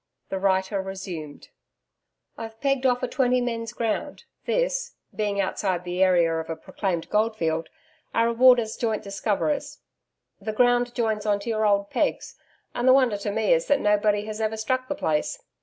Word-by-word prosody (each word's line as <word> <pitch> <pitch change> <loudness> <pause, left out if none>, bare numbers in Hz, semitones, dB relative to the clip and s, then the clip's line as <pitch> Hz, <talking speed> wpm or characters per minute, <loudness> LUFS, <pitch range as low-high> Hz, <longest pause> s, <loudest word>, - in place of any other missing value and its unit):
The 190 - -2
writer 190 +1 +1
resumed: 185 -6 -7 0.9
'I've 225 0 -8
pegged 275 -1 +1
off 250 -1 +1
a - - +1
twenty 250 -1 +2
men's 230 -2 -3
ground, 230 -2 -3 0.2
this - - -1 0.2
being 205 -2 -1
outside 190 -2 -1
the 180 +1 -3
area 175 -3 +4
of 160 - -6
a 165 - -2
proclaimed 175 -1 -3
goldfield 190 -7 0 0.4
our 230 - +2
reward 250 +1 +6
as 220 -1 -3
joint 220 -2 -1
discoverers. 210 +8 -2 0.6
The 215 +1 -4
ground 245 +1 +2
joins 220 -3 -1
on 205 -1 +2
to 235 - -5
your 215 -1 +1
old 200 0 +1
pegs; - - -1 0.4
and 245 +1 -1
the 255 - +8
wonder 255 -6 +3
to 200 +1 -4
me 215 0 +2
is 165 0 +1
that 285 - +3
nobody 210 -1 +2
has 215 0 -5
ever 220 0 -1
struck 255 +4 -1
the 290 - -2
place. 155 - -1
215 Hz, 175 wpm, -25 LUFS, 195-245 Hz, 0.9 s, the